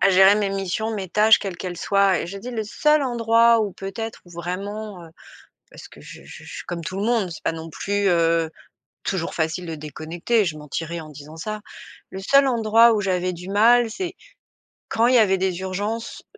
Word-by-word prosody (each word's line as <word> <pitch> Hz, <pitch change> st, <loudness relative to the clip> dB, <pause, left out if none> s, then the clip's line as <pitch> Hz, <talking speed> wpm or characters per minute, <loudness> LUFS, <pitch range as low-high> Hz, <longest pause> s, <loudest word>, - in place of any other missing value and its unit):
à 195 Hz, -, +5 dB
gérer 190 Hz, +2 st, +7 dB
mes 205 Hz, -2 st, 0 dB
missions, 195 Hz, +3 st, -2 dB
mes 195 Hz, -3 st, -4 dB
tâches, 215 Hz, +4 st, +5 dB
quelles 195 Hz, -3 st, -5 dB
qu’elles 180 Hz, 0 st, -6 dB
soient 195 Hz, 0 st, +2 dB
et -, -, -4 dB
je 195 Hz, +3 st, -7 dB
dis 240 Hz, +5 st, -7 dB
le 230 Hz, -3 st, -3 dB
seul 300 Hz, +7 st, +2 dB
endroit 230 Hz, -2 st, +3 dB
où 205 Hz, -3 st, -2 dB
peut-être, 215 Hz, +5 st, -6 dB
où 175 Hz, -, -18 dB
vraiment, 185 Hz, +3 st, -6 dB
heu, 165 Hz, -, -14 dB, 0.6 s
parce -, -, -12 dB
que -, -, -16 dB
je -, -, -12 dB
je -, -, -18 dB
je -, -, -12 dB
je -, -, -10 dB
suis -, -, -7 dB
comme 170 Hz, -1 st, -5 dB
tout 185 Hz, +4 st, -5 dB
le 200 Hz, -, -2 dB
monde. 225 Hz, -5 st, +1 dB
C'est 165 Hz, -, -9 dB
pas -, -, +1 dB
non 165 Hz, 0 st, -8 dB
plus, 200 Hz, +5 st, -1 dB
heu, 165 Hz, -2 st, +2 dB, 0.6 s
toujours 180 Hz, -4 st, -2 dB
facile 165 Hz, +2 st, -2 dB
de 165 Hz, -, -4 dB
déconnecter. 160 Hz, -, -1 dB
Je 165 Hz, -4 st, -3 dB
mentirais 165 Hz, +3 st, -5 dB
en 155 Hz, -1 st, -10 dB
disant 150 Hz, +2 st, -12 dB
ça. 215 Hz, +6 st, -5 dB, 0.5 s
Le 190 Hz, -, -7 dB
seul 275 Hz, +8 st, +4 dB
endroit 230 Hz, -2 st, +4 dB
où 210 Hz, -, 0 dB
j'avais 185 Hz, -2 st, -1 dB
du 180 Hz, +2 st, -10 dB
mal, 230 Hz, +3 st, +4 dB
c'est 365 Hz, -, -5 dB, 0.8 s
quand 230 Hz, +1 st, +2 dB
il 255 Hz, -, +4 dB
y -, -, +8 dB
avait 190 Hz, -3 st, +4 dB
des 185 Hz, -1 st, -1 dB
urgences, 205 Hz, +5 st, -4 dB
195 Hz, 215 wpm, -23 LUFS, 175-220 Hz, 0.8 s, y